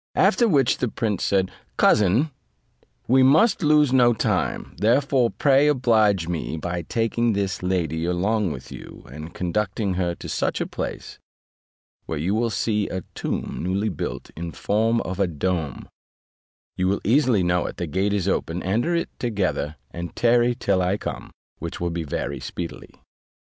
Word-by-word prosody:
After 240 - +4
which 140 - +3
the 125 - +1
prince 105 -4 -2
said, 95 -1 +1 0.3
"Cousin, 105 - +4 0.8
we 130 +2 +5
must 160 - +5
lose 150 -4 +4
no 120 -2 +5
time; - - -1
therefore 125 +3 +3
pray 140 +3 +3
oblige 110 - +3
me 85 -1 -3
by 85 +2 -3
taking 115 +5 0
this 100 -1 -2
lady 85 -3 -1
along 95 +2 0
with 65 -3 -8
you, - - -10
and 75 +3 -8
conducting 95 +2 -1
her 90 -1 -1
to - - -9
such - - -1
a - - -1
place, - - -6 0.9
where 80 - -3
you 85 +7 -1
will 115 +2 +1
see 105 0 0
a 95 - -3
tomb - - -3
newly 95 +4 0
built 90 - -5
in 85 0 -6
form 110 +8 +1
of 95 +1 -5
a 100 - +3
dome: 80 -3 -3 0.9
you 95 - 0
will 100 +2 0
easily 120 -4 +3
know 90 0 +1
it; - - -7
the 90 - -2
gate 95 +6 0
is 100 -2 0
open; 90 -2 -1
enter 115 - +1
it 170 - -2
together, 95 - -1 0.2
and 85 0 -6
tarry 120 0 +3
till 100 -6 +1
I 90 +3 +1
come, - - -6 0.3
which 85 0 -6
will 85 0 -1
be 85 0 -3
very 70 -1 -3
speedily." 85 +6 -7
100 Hz, 165 wpm, -23 LUFS, 85-120 Hz, 0.9 s, we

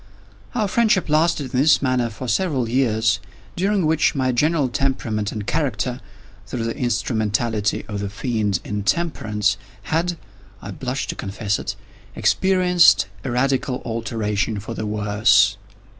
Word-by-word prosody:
Our 215 -4 +1
friendship 210 -4 +2
lasted, 155 -3 +1
in 125 - +2
this 150 +3 +5
manner, 130 -3 +1
for 115 +4 -7
several 130 - 0
years, 110 -3 +2 0.4
during 195 0 +1
which 155 -1 +2
my 130 -2 +1
general 150 +3 +2
temperament 120 -5 -1
and 105 -2 -5
character—through 110 -4 -4
the 115 0 -2
instrumentality 110 -4 0
of 105 -2 -4
the 100 0 -3
Fiend 105 -2 -1
Intemperance—had 115 - -1 0.4
(I 100 - -8
blush 130 +6 -3
to - - -4
confess 100 +1 -2
it) - - -4 0.4
experienced 180 - +4
a 135 - -3
radical 130 +1 0
alteration 110 -3 -2
for 110 +3 -6
the 110 -1 -4
worse. 105 +2 +3
120 Hz, 130 wpm, -21 LUFS, 105-145 Hz, 0.4 s, this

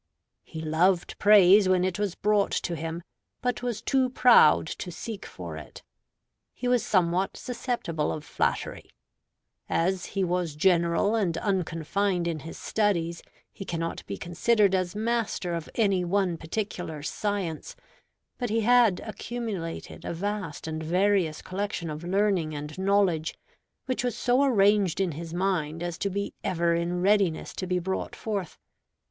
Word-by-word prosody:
He 160 - -8
loved 170 +3 +1
praise 200 -1 +7
when 185 -1 +3
it 185 0 -1
was 205 -4 -1
brought 210 -1 +2
to 175 - -1
him, 165 +2 -5 0.4
but 250 -1 -1
was 240 -3 -3
too 265 -2 +2
proud 230 - +6
to 180 - -6
seek 210 +4 -7
for 85 -3 -8
it. 75 - -11 0.7
He 250 - -3
was 245 -3 +3
somewhat 185 -3 +1
susceptible 235 - -2
of 155 - -5
flattery. - - -2 0.8
As 180 +2 0
he 195 - +3
was 175 -3 -1
general 170 +4 +3
and 190 -7 0
unconfined 180 0 -1
in 165 -2 -2
his 160 +3 -9
studies, 170 -6 0 0.3
he - - -7
cannot 165 -2 -4
be 100 - -4
considered 200 - +2
as 185 0 0
master 220 -5 -1
of 165 -2 -4
any 195 -5 +2
one 185 0 +1
particular 165 -3 -4
science; 195 -3 -3 0.6
but 245 -2 -2
he 225 +2 +1
had 235 -4 +4
accumulated 215 -7 -5
a - - -4
vast 200 -4 -4
and 160 0 -4
various 180 -1 +1
collection 185 -3 -3
of 150 +2 -6
learning 185 -4 +1
and 150 +3 -6
knowledge, 190 -5 +2 0.5
which 255 -1 -1
was 245 -2 -1
so 250 +3 +3
arranged 205 - +3
in 190 -3 +1
his 165 +2 -7
mind 170 -3 -1
as 175 -1 -4
to 200 - 0
be 200 +1 -3
ever 170 -1 +1
in 175 +1 -1
readiness 195 -5 +2
to 185 - -4
be 180 0 +1
brought 190 +2 -3
forth. 200 -6 -4
185 Hz, 150 wpm, -27 LUFS, 165-205 Hz, 0.8 s, praise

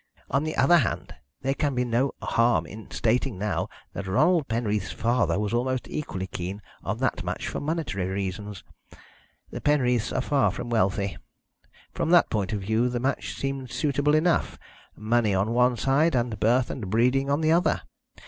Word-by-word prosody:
On 140 - +2
the 155 0 -3
other 135 +7 +5
hand, 120 - -2 0.3
there 135 +1 +1
can 140 -2 -1
be 125 0 +1
no 120 +3 +1
harm 115 0 +2
in 110 +2 -10
stating 120 -1 0
now 105 +1 -2 0.2
that 100 - -5
Ronald 155 - +3
Penreath's 105 -4 -1
father 115 -7 +1
was 105 +1 -2
almost 130 +1 -1
equally 95 -11 -4
keen 95 +2 -5 0.2
on - - -2
that - - -1
match - - -3
for - - -3
monetary 145 - -2
reasons. 95 -1 -4 0.9
The - - -6
Penreaths 125 -5 +2
are 130 - 0
far 140 +1 +2
from 120 - -5
wealthy. 100 -2 +1 0.8
From - - -1
that 175 -1 +5
point 100 -4 -1
of 105 -2 -2
view 110 +5 +1
the 120 0 -2
match 135 +3 -2
seemed 135 -2 -4
suitable 145 +4 +1
enough 165 +1 +1 0.4
money 110 -1 +1
on 100 +4 +1
one 125 +1 +3
side, 140 +5 +2
and 120 -4 -1
birth 120 +4 +2
and 105 -7 -5
breeding 125 +6 +2
on 140 +3 +1
the 155 0 +3
other. 170 +2 +2
120 Hz, 175 wpm, -26 LUFS, 105-140 Hz, 0.9 s, other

